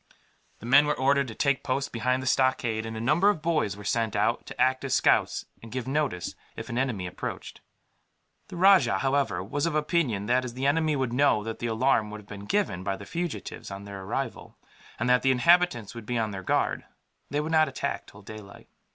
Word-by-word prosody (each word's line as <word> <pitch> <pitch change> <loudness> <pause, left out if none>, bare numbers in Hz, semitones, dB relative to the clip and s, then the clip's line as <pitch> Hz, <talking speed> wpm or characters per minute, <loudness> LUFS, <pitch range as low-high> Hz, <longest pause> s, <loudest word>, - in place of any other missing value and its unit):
The - - -12
men 140 +5 +6
were 150 - 0
ordered 140 +1 +2
to 115 - -8
take 140 -2 +1
post 135 +2 -2
behind 125 +2 0
the - - -6
stockade, 120 -4 +1
and 110 0 -6
a - - -4
number 150 - +3
of 205 - +1
boys 155 -12 0
were 105 - -10
sent 115 +1 -1
out, 105 +3 0
to - - -10
act 130 +1 +2
as 135 -2 0
scouts - - +2 0.2
and 115 - -11
give 130 0 -4
notice 135 - -1 0.2
if - - -7
an 120 - -3
enemy 120 -9 -1
approached. 90 - -6 0.9
The - - -9
rajah, 185 - +5
however, 135 +6 0
was 145 +3 -1
of 160 - -2
opinion 150 - 0
that, 125 +4 +2
as 120 -2 -6
the 130 +1 -3
enemy 155 +1 +2
would 130 -3 -1
know 125 -5 +3
that 115 +1 -5
the 120 - -2
alarm 115 -1 +1
would 105 0 -7
have 105 - -16
been 100 -1 -9
given 145 - -1
by 95 0 -2
the 100 - -10
fugitives, 170 - -5
on 100 0 -7
their 100 -1 -8
arrival, 115 +6 -5 0.4
and 120 - -1
that 125 0 +4
the 135 - +2
inhabitants 130 - +3
would 115 -3 -9
be 120 - -1
on 110 -2 -1
their 95 -1 -6
guard, - - 0 0.5
they 145 - -1
would 155 +2 -3
not 155 -1 +4
attack 130 - -4
till 100 0 -15
daylight. 105 -1 -11
125 Hz, 220 wpm, -27 LUFS, 110-145 Hz, 0.9 s, men